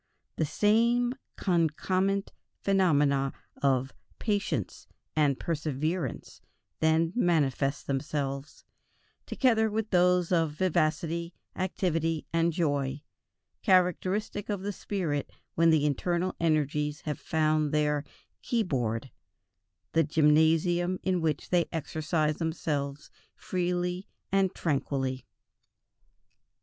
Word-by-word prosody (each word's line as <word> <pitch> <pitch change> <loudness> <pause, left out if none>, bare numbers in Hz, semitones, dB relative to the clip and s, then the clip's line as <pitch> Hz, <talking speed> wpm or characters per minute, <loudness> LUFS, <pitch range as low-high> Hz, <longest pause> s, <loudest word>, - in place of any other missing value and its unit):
The 160 - +1
same 235 - +3 0.2
concomitant 185 +3 0 0.3
phenomena 145 -8 +3 0.3
of 135 -1 +1 0.2
"patience" 205 -2 -2 0.3
and 145 -4 +2
"perseverance" 155 -1 -3 0.4
then 160 +2 +2
manifest 145 - +1
themselves, 140 0 -3 0.6
together 225 -4 +2
with 215 0 -2
those 180 -1 +3
of 165 -4 +2
vivacity, 170 0 0 0.2
activity, 165 -4 -1
and 165 0 +3
joy, 145 -3 -1 0.6
characteristic 190 +2 +1
of 200 -2 -2
the 205 +1 -2
spirit 170 -9 -2 0.2
when 165 0 +4
the 155 -2 +4
internal 175 +5 0
energies 150 -2 0
have 150 -2 -4
found 155 -2 +1
their 150 -1 +1 0.4
keyboard, 130 - -1 0.8
the 165 - +3
gymnasium 160 +4 +3
in 185 -2 +1
which 155 -2 -1
they 175 -2 +3
exercise 155 -1 -1
themselves 150 -3 -3 0.2
freely 180 +1 -2 0.2
and 195 -1 +2
tranquilly. 135 -4 -1
160 Hz, 90 wpm, -29 LUFS, 150-185 Hz, 0.8 s, when